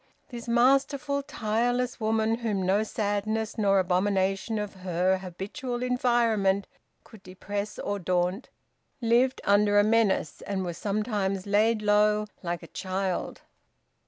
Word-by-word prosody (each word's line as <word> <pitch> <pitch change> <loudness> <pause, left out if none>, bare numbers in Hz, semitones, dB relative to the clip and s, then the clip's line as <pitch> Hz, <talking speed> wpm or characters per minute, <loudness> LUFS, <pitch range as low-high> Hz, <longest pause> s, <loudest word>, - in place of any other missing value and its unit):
This 240 -2 -8
masterful, 275 +4 +2
tireless 245 +1 -1
woman, 220 +1 +1
whom 210 -5 -1
no 195 +3 +3
sadness 215 +1 -2
nor 200 -2 +2
abomination 195 +3 +1
of 210 -1 -4
her 185 0 0
habitual 225 - -5
environment 230 -6 +2 0.4
could 220 -4 -16
depress 200 +3 -5
or 205 0 -3
daunt, 180 +4 -1 0.5
lived 245 +2 +2
under 205 0 +3
a 205 - +6
menace, 215 -6 +1
and 190 -2 -2
was 175 -1 -5
sometimes 200 -2 -1
laid 215 +2 +2
low, 210 0 +3 0.2
like 175 -1 -4
a - - -10
child. 190 -1 -3
210 Hz, 125 wpm, -27 LUFS, 190-230 Hz, 0.5 s, a